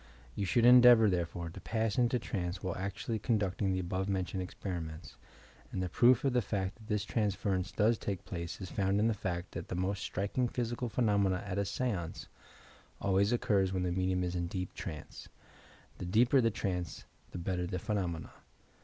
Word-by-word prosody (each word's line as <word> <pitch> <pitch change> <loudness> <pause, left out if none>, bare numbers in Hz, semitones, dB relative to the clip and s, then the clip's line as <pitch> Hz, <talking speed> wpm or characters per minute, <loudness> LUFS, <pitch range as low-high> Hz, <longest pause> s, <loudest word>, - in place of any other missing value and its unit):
You 100 - -2
should 115 +5 +3
endeavour, 120 -2 +8
therefore, 85 -1 -2
to - - -10
pass 110 -2 -1
into 125 +1 +3
trance 90 -5 -4
while 90 -2 -2
actually 100 +4 -3
conducting 100 -4 0
the 95 - 0
above 95 +2 -2
mentioned 95 0 -1
experiments, 85 -3 -6 0.6
and 95 - -2
the 90 - -2
proof 125 +7 +5
of 135 - +2
the 125 - +3
fact 100 -2 -2
that 110 -2 -15
this 105 -2 0
transference 100 -4 -1
does 110 +1 +2
take 100 -3 -4
place 85 -2 -5
is 95 -2 -7
found 100 0 +1
in 110 - +3
the 115 - +2
fact 90 -3 -4
that 85 0 -6
the - - -4
most 95 +2 -1
striking 100 +6 -1
physical 120 0 -2
phenomena 100 -5 +2
at 100 0 -2
a 100 - +1
seance 100 -5 -3 0.7
always 100 +2 +2
occur 105 -5 +2
when 95 -1 -1
the 90 - 0
medimn 90 0 0
it 90 0 -2
in 85 -1 -1
deep 90 +1 -4
trance. 75 -4 -8 0.7
The - - -4
deeper 120 +8 +4
the 115 - +3
trance, 90 -6 -3 0.2
the - - -7
better 90 0 -2
the 90 0 -3
phenomena! 90 -5 -2
95 Hz, 185 wpm, -32 LUFS, 90-110 Hz, 0.7 s, endeavour